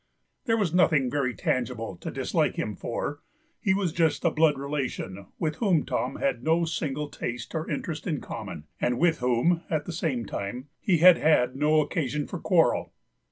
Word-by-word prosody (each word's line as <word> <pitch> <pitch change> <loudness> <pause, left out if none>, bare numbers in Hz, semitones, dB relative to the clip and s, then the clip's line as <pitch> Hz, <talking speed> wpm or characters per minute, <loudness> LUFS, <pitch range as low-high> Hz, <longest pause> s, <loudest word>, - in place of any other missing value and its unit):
There 225 -3 +2
was 195 -7 0
nothing 155 -8 +3
very 135 -4 0
tangible 115 -5 -2
to - - -6
dislike - - 0
him - - -3
for; 145 - -4 0.4
he 190 -4 +2
was 190 -5 0
just 165 -2 +1
a 170 - +4
blood 155 -2 +3
relation, 130 -9 -4
with 155 -2 -2
whom 185 -9 +2
Tom - - -2
had 275 -1 -1
no 165 +2 +2
single 150 -3 -2
taste 120 -4 -5
or 160 -1 -3
interest 160 -2 -4
in 155 -5 -1
common, 80 - -7 0.2
and 120 0 +1
with 170 +1 +2
whom, 125 +8 +2
at 155 -2 -1
the 175 - -5
same 140 -8 -1
time, 120 +9 -5
he 180 -4 +2
had 175 +1 +8
had 130 -5 +3
no 150 +2 +3
occasion 150 -1 -2
for - - -6
quarrel. - - +2
150 Hz, 180 wpm, -27 LUFS, 130-170 Hz, 0.4 s, had